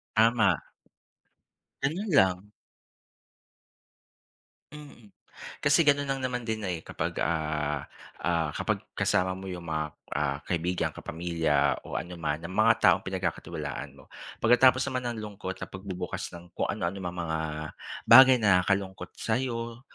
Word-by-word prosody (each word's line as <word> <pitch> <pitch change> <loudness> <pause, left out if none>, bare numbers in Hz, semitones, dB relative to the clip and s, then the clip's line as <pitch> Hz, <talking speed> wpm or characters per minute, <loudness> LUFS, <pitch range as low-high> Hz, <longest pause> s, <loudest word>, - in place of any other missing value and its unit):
Tama. 110 -5 +4 1.2
Ganun 180 +9 -1
lang. 95 - +3 2.2
Mm, 145 -7 -13 0.6
kasi 140 +4 +5
gaon'n 145 -2 +3
lang 135 -1 -2
naman 125 -2 -2
din, 110 -1 -2
eh, 90 -5 -4
kapag, - - -4
ah, 75 -3 -1 0.3
ah, 80 -3 0
kapag - - -2
kasama 95 0 +1
mo 95 +1 -7
yung 90 -2 -6
mga, 80 -1 -1 0.3
ah, - - 0
kaibigan, 90 +1 -1
kapamilya 80 -4 0
o - - -4
anoman 85 -3 -3
ng 90 - -6
mga 110 +3 +5
taong - - +6
pinagkakatiwalaan 85 -7 -4
mo. 65 - -16 0.3
Pagkatapos 130 +2 +5
naman 130 -1 -2
nang 120 - -5
lungkot 105 -3 -6
na - - -5
pagbubukas 95 -1 -5
ng 85 0 -16
kung - - -2
anu-anong 95 +3 -2
mga 85 -2 -3 0.7
bagay 130 +2 +9
na 100 -6 +4
nakakalungkot 95 -1 -2
sa'yo, 115 0 -2
95 Hz, 125 wpm, -28 LUFS, 85-115 Hz, 2.2 s, bagay